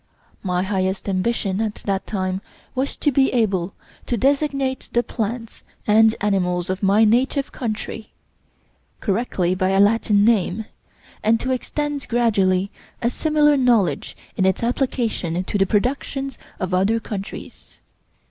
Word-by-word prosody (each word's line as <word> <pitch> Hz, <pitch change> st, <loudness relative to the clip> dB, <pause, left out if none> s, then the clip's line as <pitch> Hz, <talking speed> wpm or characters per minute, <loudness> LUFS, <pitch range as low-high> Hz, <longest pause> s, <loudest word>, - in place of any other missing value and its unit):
My 180 Hz, -2 st, 0 dB
highest 190 Hz, 0 st, -1 dB
ambition 195 Hz, +1 st, 0 dB
at 215 Hz, -2 st, -1 dB
that 195 Hz, -1 st, -3 dB
time, 185 Hz, -2 st, -2 dB, 0.3 s
was 265 Hz, +2 st, -2 dB
to 290 Hz, -, +1 dB
be 270 Hz, 0 st, +3 dB
able 195 Hz, -6 st, 0 dB, 0.3 s
to 240 Hz, -, 0 dB
designate 275 Hz, 0 st, 0 dB
the 240 Hz, -, +3 dB
plants 230 Hz, 0 st, -4 dB, 0.2 s
and 220 Hz, +1 st, +5 dB
animals 180 Hz, -3 st, 0 dB
of 185 Hz, -, -4 dB
my 205 Hz, +3 st, +4 dB
native 260 Hz, +5 st, +2 dB
country 220 Hz, -2 st, -5 dB, 0.9 s
correctly 195 Hz, -4 st, 0 dB
by 185 Hz, 0 st, 0 dB
a 195 Hz, 0 st, +2 dB
Latin 205 Hz, 0 st, +4 dB
name, 220 Hz, -2 st, +2 dB, 0.6 s
and 225 Hz, +1 st, +3 dB
to 260 Hz, -, -2 dB
extend 290 Hz, +2 st, -2 dB
gradually 200 Hz, -5 st, +2 dB, 0.3 s
a 235 Hz, -, 0 dB
similar 300 Hz, +1 st, +3 dB
knowledge 240 Hz, -8 st, +1 dB, 0.2 s
in 190 Hz, -, +1 dB
its 190 Hz, +4 st, 0 dB
application 230 Hz, -8 st, -1 dB
to 185 Hz, -, -6 dB
the 195 Hz, -, +3 dB
productions 270 Hz, +4 st, -1 dB, 0.2 s
of 185 Hz, 0 st, -2 dB
other 195 Hz, +5 st, +2 dB
countries. 200 Hz, -3 st, -8 dB
220 Hz, 135 wpm, -22 LUFS, 190-245 Hz, 0.9 s, and